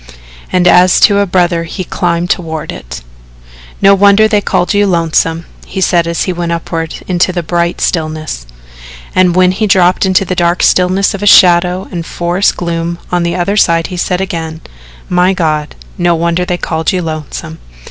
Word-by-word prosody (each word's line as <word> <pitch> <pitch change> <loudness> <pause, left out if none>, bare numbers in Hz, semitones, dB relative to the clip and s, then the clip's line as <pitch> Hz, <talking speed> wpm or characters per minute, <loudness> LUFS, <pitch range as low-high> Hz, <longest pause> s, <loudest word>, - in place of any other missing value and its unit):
And 180 -1 +2
as 180 +1 +5
to 200 -1 +5
a 200 - +1
brother 175 -2 0
he 185 +3 -6
climbed 175 -1 -2
toward 160 -3 -3
it. - - -9 0.8
"No 195 0 +7
wonder 200 +2 +4
they 210 -2 +1
call 180 - 0
you 205 0 +2
Lonesome," 165 -1 0 0.2
he - - -5
said 175 -2 +1
as 170 0 -1
he 185 - -2
went 170 -1 -3
upward 165 -1 -4
into 180 0 +1
the 175 -1 -3
bright 170 +1 -1
stillness, 155 - -3 0.7
and 180 -1 +2
when 185 0 +4
he 210 +3 -1
dropped 185 -2 +3
into 190 0 +2
the 185 - -3
dark 175 0 0
stillness 185 +3 +2
of 205 +1 +1
shadow 180 0 +4
and 175 -3 -4
forest 175 +3 -1
gloom 170 0 -3
on 180 -1 +1
the 170 0 -1
other 185 +3 -1
side 165 -5 +2
he - - -4
said 180 +1 -1
again: 160 -4 -5 0.5
"My 180 +1 +2
God, 155 -4 -2 0.2
no 175 -1 +2
wonder 170 +2 -1
they 180 0 -2
call 160 -2 -3
you 180 -2 -1
Lonesome." 155 - -6
175 Hz, 180 wpm, -12 LUFS, 165-185 Hz, 0.8 s, No